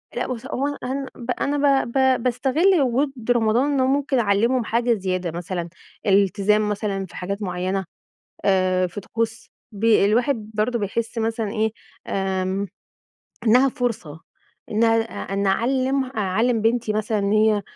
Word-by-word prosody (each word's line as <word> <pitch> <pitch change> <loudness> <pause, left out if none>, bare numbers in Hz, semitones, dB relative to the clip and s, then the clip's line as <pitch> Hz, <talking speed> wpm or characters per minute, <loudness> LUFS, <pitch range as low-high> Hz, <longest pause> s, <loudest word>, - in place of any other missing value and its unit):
لأ - - -1
بُصي 245 -3 -5
هو 275 +3 0
أنا 290 - -4
أهم 270 +1 -3 0.3
أنا 280 -1 +2
ب 235 - -7
ب 265 -2 +2
باستغل 285 +8 +2
وجود 270 +2 +1 0.2
رمضان 240 +4 +2
إن 275 - +1
هو 260 - +3
ممكن 275 -1 +1
أعلِّمهم 230 +4 +2
حاجة 235 +2 +1
زيادة 185 -4 -2
مثلًا، 175 0 -4 0.4
الالتزام 205 +1 +3
مثلًا 200 -2 -2
في - - -15
حاجات 200 +3 -4
معينة، 185 0 -2 0.6
آآ 185 -1 +2
في 200 +4 -7
طقوس 225 +2 -3 0.2
ب 210 +1 -9
الواحد 220 +1 +2
برضه 225 +3 0
بيحس 225 +3 -3
مثلًا 225 -1 -1
إيه، 220 -1 0 0.4
آمم، 190 0 -1 0.8
إنها 250 +5 +5
فرصة، 200 -12 -4 0.5
إنها 225 +1 +3 0.4
إن 200 0 0
أعلِّم 260 +6 +1
أعلِّم 225 0 0
بنتي 225 -1 +1
مثلًا 210 -1 0
هي، 215 -1 +3
220 Hz, 140 wpm, -22 LUFS, 200-250 Hz, 0.8 s, إنها